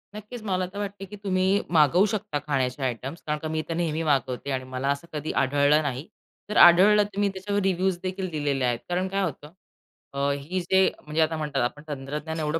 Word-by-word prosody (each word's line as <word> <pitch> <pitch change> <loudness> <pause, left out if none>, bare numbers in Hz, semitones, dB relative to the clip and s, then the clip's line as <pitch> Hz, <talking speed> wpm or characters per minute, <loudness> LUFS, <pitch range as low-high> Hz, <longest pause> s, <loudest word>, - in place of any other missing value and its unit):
नक्कीच. 215 +3 -8
मला 185 -3 0
तर 200 - -6
वाटते 200 -1 -5
की 210 - -10
तुम्ही 190 0 +2
मागवू 170 +4 +5
शकता 170 -8 -2
खाण्याचे 135 -1 -1
आयटम्स 130 +5 -4
कारण 150 0 0
का 155 - -5
मी 155 0 -1
तर - - -1
नेहमी 165 -1 -1
मागवते 135 -3 0
आणि 130 -1 -2
मला 130 +2 -1
असं 140 +4 -2
कधी 150 0 -3
आढळलं 145 +3 +3
नाही. 140 +1 -4 0.4
जर 210 - -1
आढळलं 195 +5 +8
तर 200 -1 -6
मी 205 - +3
त्याच्यावर 200 +1 -2
रिव्ह्यूज 190 -1 +1
देखील 185 0 -3
दिलेले 145 -4 -1
आहेत. 120 -1 0
कारण 180 +1 0
काय 195 +1 -1
होतं 150 -3 -5 0.6
अ, 140 - -4
ही 145 +7 -3
जे 190 +2 +2 0.3
म्हणजे 155 +1 0
आता 160 0 +1
म्हणतात 150 -3 -2
आपण 150 +5 -3
तंत्रज्ञान 150 +3 -5
एवढं 155 +1 -1
160 Hz, 205 wpm, -25 LUFS, 140-190 Hz, 0.6 s, आढळलं